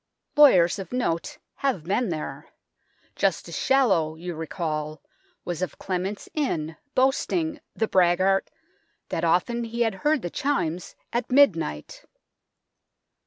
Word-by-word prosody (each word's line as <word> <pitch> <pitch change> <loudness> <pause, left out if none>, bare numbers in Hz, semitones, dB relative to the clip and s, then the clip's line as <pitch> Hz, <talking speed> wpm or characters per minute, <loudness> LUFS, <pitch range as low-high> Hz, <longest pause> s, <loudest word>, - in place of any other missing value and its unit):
Lawyers 205 - +6
of 195 - -7
note 250 - -2 0.2
have 260 - -1
been 200 +6 0
there. 155 -3 -5 0.7
Justice - - -1
Shallow, 195 - +2
you 175 +2 -6
recall, 155 -1 -4 0.5
was 175 -1 -4
of 185 - -3
Clement's 190 +2 -3
Inn, 165 - -1 0.2
boasting 295 +4 +1 0.2
the 220 - 0
braggart! 185 +1 +3 0.6
that - - -2
often 180 +9 +1
he 235 +1 -4
had 225 -3 +2
heard 300 -2 +2
the 175 - -4
chimes 185 - -2 0.2
at 240 +1 -2
midnight. 165 - +2
190 Hz, 120 wpm, -25 LUFS, 165-255 Hz, 0.7 s, Lawyers